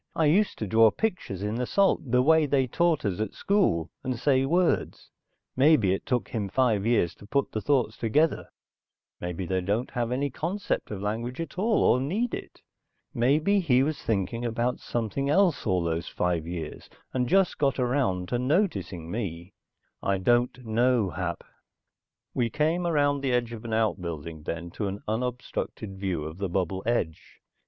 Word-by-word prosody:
I 160 - +2
used 195 +8 +3
to 110 - -3
draw 110 +2 +5
pictures 175 - -3
in 105 +1 -1
the 125 +1 -2
salt, 195 -9 +2
the 125 +1 +4
way 160 +1 +4
they 135 -1 +2
taught 165 +3 +1
us 95 -2 -1
at 110 -2 -3
school, 185 - +1
and 130 -2 -2
say 135 +1 +2
words. 175 +3 0 0.4
Maybe 130 -8 +4
it 95 - -4
took 125 -3 0
him 105 -4 -3
five 110 -3 +2
years 115 -8 +2
to 100 - -14
put 140 +5 0
the 110 - -3
thoughts 125 -5 +1
together, 145 +9 +1 0.7
maybe 90 +1 -4
they 95 +1 0
don't 105 +7 -1
have 120 -2 -2
any 140 +2 -1
concept 180 +9 -2
of 100 -2 -5
language 115 +6 -3
at 165 +2 -5
all, 220 +2 +2
or 125 - +4
need 210 - -1
it. - - -7 0.5
Maybe 150 +12 +3
he 135 -8 +3
was 155 +1 -2
thinking 110 +2 -1
about 120 +1 -1
something 120 +4 -2
else 175 - +3
all 90 -3 +2
those 85 0 -2
five 85 -2 -1
years, 85 -3 -6 0.2
and 125 -1 0
just 195 -1 +3
got 140 -3 +2
around 120 -8 0
to 120 - 0
noticing 100 - -1
me. 95 -4 -5 0.5
I 100 0 +1
don't 120 +5 +1
know, 115 -2 +2
Hap." 90 -1 -4 0.9
We 120 -2 +1
came 160 +5 0
around 145 -3 +2
the 135 -2 0
edge 120 -1 0
of 115 -1 -8
an 115 - -3
outbuilding 85 -8 -2
then 85 +1 -4
to 105 - -3
an 100 +1 -5
unobstructed 110 -3 -3
view 95 -5 -2
of 80 +4 -7
the 100 -2 -2
bubble 95 +1 -1
edge. 85 -10 -2
120 Hz, 175 wpm, -27 LUFS, 95-140 Hz, 0.9 s, draw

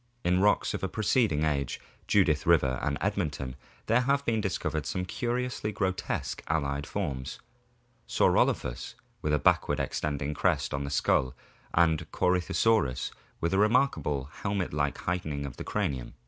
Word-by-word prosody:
In 90 +1 +3
rocks 105 +1 +3
of - - -3
a - - +2
preceding 110 - +2
age, 70 -4 -1 0.3
Judith 80 -8 +3
River 65 -7 +4
and 70 0 -1
Edmonton, 75 -10 -2 0.3
there 115 +3 +3
have 140 +2 +1
been 110 -2 +1
discovered 80 -6 -2
some 90 -1 -2
curiously 120 +2 -2
grotesque 95 -2 -2
allied 70 -3 -1
forms, 65 -2 -4 0.7
Saurclophus - - +1 0.3
wfth 75 - +1
a - - +3
backward 75 0 +2
extended 75 +1 -2
crest 75 -5 +1
on 70 0 -2
the - - -4
skull, 65 -2 +1 0.4
and 80 -2 +2
Corythosaurus 90 - +1 0.3
with 85 +2 0
a - - +3
most - - +4
remarkable 105 - +2
helmet 100 -5 -1
like 75 -1 0
heightening 80 -5 -2
of 65 - -7
the - - -5
cranium. 65 -3 -2
80 Hz, 145 wpm, -29 LUFS, 70-100 Hz, 0.7 s, River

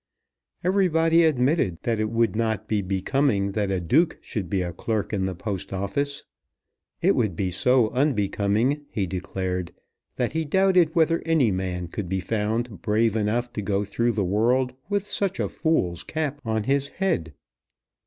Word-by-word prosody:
Everybody 170 -3 +3
admitted 130 - +1
that 115 -2 0
it 110 0 0
would 115 -3 +1
not 110 -1 -1
be 105 -2 +1
becoming 100 +2 0
that 100 -1 -1
a 95 -1 0
Duke 155 - +2
should 100 -8 -5
be 95 0 0
a 85 -1 -4
clerk 110 +4 -2
in 95 -2 0
the 95 -1 -3
Post 95 0 -5
Office. 100 +10 -2 0.8
It - - +5
would 110 -8 0
be 95 +1 -1
so 125 +4 +3
unbecoming, 120 0 +1
he 100 - -1
declared, 90 -1 -3 0.4
that 125 -2 -1
he 160 +1 -1
doubted 180 0 +3
whether 165 0 +3
any 160 -9 +3
man 90 -2 -3
could 90 +1 -5
be 95 0 0
found 110 -1 -2
brave 110 +2 +2
enough 115 +3 0
to - - -3
go 100 0 0
through 115 +4 0
the 100 -3 0
world 120 +7 +2 0.2
with 205 -1 0
such 200 -2 -1
a - - +1
fool's 90 - 0
cap 150 -2 -3
on 110 -1 -1
his 140 +4 +1
head. 85 - -2
110 Hz, 165 wpm, -25 LUFS, 95-140 Hz, 0.8 s, It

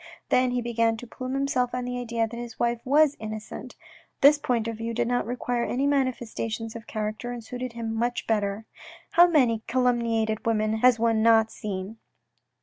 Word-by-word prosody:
Then 255 0 +3
he 245 -1 -1
began 230 -1 +1
to 245 - -8
plume 255 +2 -5
himself 255 -3 0
on 250 0 -3
the 250 0 -3
idea 230 -1 -1
that 230 - -9
his 235 -1 -8
wife 235 0 0
was 290 +2 +4
innocent. 215 0 -7 0.5
This 290 +2 +7
point 235 -5 0
of 230 -1 -4
view 230 +1 -4
did 240 0 0
not 245 -2 0
require 245 0 -2
any 260 +4 -1
manifestation 240 -5 -1
of 230 -1 -9
character, 215 +2 -4
and 240 -1 -6
suited 250 +1 -6
him 230 -1 -4
much 240 +2 -1
better. 210 -1 -1 0.2
" - - -20
How 345 +1 +7
many 250 -10 +3
calumniated 230 -3 +1
women 220 -1 +1
has 250 +1 +5
one 225 -1 +2
not 225 -1 +5
seen 200 +1 -5
235 Hz, 185 wpm, -26 LUFS, 225-250 Hz, 0.5 s, This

